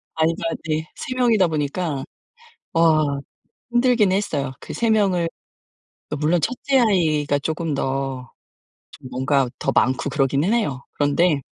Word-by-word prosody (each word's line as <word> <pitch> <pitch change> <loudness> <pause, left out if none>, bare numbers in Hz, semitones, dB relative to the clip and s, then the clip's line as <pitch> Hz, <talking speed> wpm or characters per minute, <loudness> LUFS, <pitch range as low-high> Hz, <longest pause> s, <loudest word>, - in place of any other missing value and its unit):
아이가 165 +1 0 0.2
네. 155 +1 -1
3 255 - -5
명이다 225 -8 +3
보니까 150 -1 -2 0.7
와 155 -4 +3 0.5
힘들긴 240 -5 +3
했어요. 145 -9 -1
그 - - -8
3 230 -1 +1
명을 190 -6 +2 0.8
그 150 - -2
물론 155 +4 +1
1 250 - 0
째 270 -1 +3
아이가 155 -10 +2
쪼금 160 +1 -2
더 135 -2 -3 0.6
좀 135 -3 -11
뭔가 130 +1 +1
더 - - -1
많고 130 +2 +1
그러기는 140 - +1
해요. 140 - -1
그런데 145 +1 +2
155 Hz, 235 characters per minute, -22 LUFS, 140-185 Hz, 0.8 s, 명이다